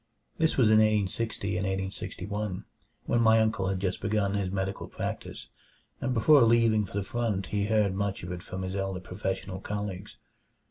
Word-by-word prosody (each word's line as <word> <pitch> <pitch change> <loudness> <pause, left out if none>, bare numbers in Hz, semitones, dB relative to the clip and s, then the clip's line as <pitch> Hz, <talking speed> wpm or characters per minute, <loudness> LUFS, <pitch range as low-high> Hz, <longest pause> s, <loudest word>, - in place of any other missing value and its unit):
This 160 0 +2
was 120 -5 +5
in 110 - +7
1860 105 -1 0
and 95 - -1
1861, 95 +1 -4 0.4
when 120 - +2
my 110 0 +6
uncle 110 -3 +1
had 95 -1 -1
just 95 -1 -2
begun 100 -1 0
his 100 -2 -1
medical 95 +1 -3
practise; - - -5 0.5
and 130 - -1
before 135 +5 +6
leaving 115 -2 +4
for 100 - -6
the 100 - 0
front 105 -3 -1
he 100 0 +1
heard 105 -3 +2
much 100 -1 -2
of 90 - -5
it 90 -1 -5
from 95 +1 -6
his 95 +1 -4
elder 95 -1 -2
professional 95 0 -4
colleagues. 100 -1 -5
100 Hz, 175 wpm, -28 LUFS, 95-110 Hz, 0.5 s, in